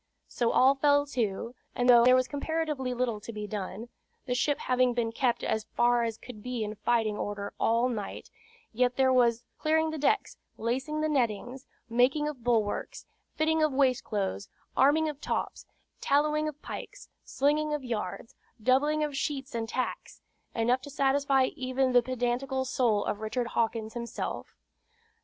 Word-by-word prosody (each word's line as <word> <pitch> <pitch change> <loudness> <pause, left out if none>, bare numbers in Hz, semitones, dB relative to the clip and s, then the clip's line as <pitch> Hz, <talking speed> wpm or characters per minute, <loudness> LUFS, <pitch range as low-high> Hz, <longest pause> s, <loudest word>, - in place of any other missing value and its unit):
So 235 -2 0
all 265 +2 +5
fell 285 +1 +3
to; 235 -4 -2 0.2
and 245 - +1
though 240 -1 +8
there 255 +1 +7
was 255 0 +2
comparatively 300 -3 -2
little 245 -3 -1
to 220 - -8
be 210 -1 -5
done, 210 +2 -5 0.4
the 250 - -1
ship 280 +4 +1
having 255 -1 +2
been 230 -2 0
kept 240 0 0
as 220 -1 -1
far 240 0 +3
as 225 -1 -3
could 245 -4 -11
be 250 -1 -3
in 210 0 -4
fighting 215 0 0
order 205 -1 -4
all 230 +2 +2
night, 220 -5 -5 0.4
yet 250 +2 +1
there 260 0 +3
was 240 -2 +3 0.2
"clearing 315 +1 +2
the 315 - -5
decks, 415 +9 +1 0.2
lacing 265 +7 -2
the 310 - +1
nettings, 250 -2 -1 0.2
making 250 +6 +2
of 275 -6 -6
bulwarks, 225 -4 -1 0.3
fitting 315 +1 +2
of 310 -2 +2
waist 260 -2 +2
cloths, 200 -2 -3 0.3
arming 305 +4 +4
of 300 -1 -5
tops, - - -3 0.3
tallowing 300 +2 +2
of 300 -1 -6
pikes, - - -8 0.2
slinging 300 +2 +1
of 295 -2 -2
yards, 225 -3 -4 0.3
doubling 280 +6 +2
of 295 -2 -3
sheets 275 -2 -3
and 225 -1 -3
tacks," 255 +1 -4 0.3
enough 240 +3 +2
to 285 - -9
satisfy 275 -1 +2
even 260 -1 0
the 245 0 +6
pedantical 255 +2 -1
soul 235 -5 +1
of 205 - -2
Richard 235 +2 -2
Hawkins 225 -1 -1
himself. 235 -1 -5
250 Hz, 165 wpm, -29 LUFS, 230-285 Hz, 0.4 s, though